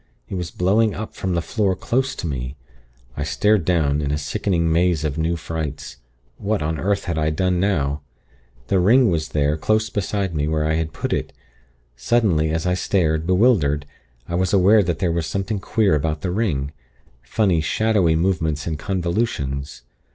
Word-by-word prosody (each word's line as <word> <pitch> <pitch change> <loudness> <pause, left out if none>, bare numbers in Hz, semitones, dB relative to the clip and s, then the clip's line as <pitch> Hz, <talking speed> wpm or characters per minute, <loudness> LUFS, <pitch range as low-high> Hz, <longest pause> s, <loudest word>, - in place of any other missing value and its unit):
It - - -9
was 90 -2 -3
blowing 105 +4 +2
up 110 +1 -6
from 95 -2 -2
the 85 - 0
floor 100 -2 0
close 130 +7 -1
to - - -5
me. 65 -3 -4 0.6
I - - -3
stared 105 -3 +2
down, 75 -5 +1
in 70 - -2
a 75 - 0
sickening 85 +3 0
maze 85 -1 +2
of 75 -2 -1
new 80 +2 0
frights. 80 -3 -5 0.4
What 105 -3 -1
on 80 +1 -2
earth 100 +1 0
had 85 -2 -2
I 75 0 +1
done 90 +3 0
now! 75 -7 0 0.6
The 95 - +1
ring 115 +4 +5
was 80 -2 -1
there, 75 0 +1
close 110 +6 +1
beside 100 -2 -2
me, 75 -1 -1
where 80 -1 0
I 80 - +1
had 80 0 -1
put - - -3
it. - - -3 0.6
Suddenly, 80 - +2
as 80 +1 -1
I 90 - +2
stared, 80 -3 0
bewildered, 90 - +3 0.4
I - - -6
was 90 +2 0
aware 100 +3 +6
that 85 -3 -1
there 85 +1 0
was 85 -1 -1
something 100 +1 -2
queer 105 -1 +1
about 75 +1 -1
the 90 - -2
ring 85 -10 -1 0.5
funny 95 - +1
shadowy 95 -1 +2
movements 80 -4 0
and 80 -2 -3
convolutions. 85 - -2
85 Hz, 180 wpm, -21 LUFS, 75-100 Hz, 0.6 s, aware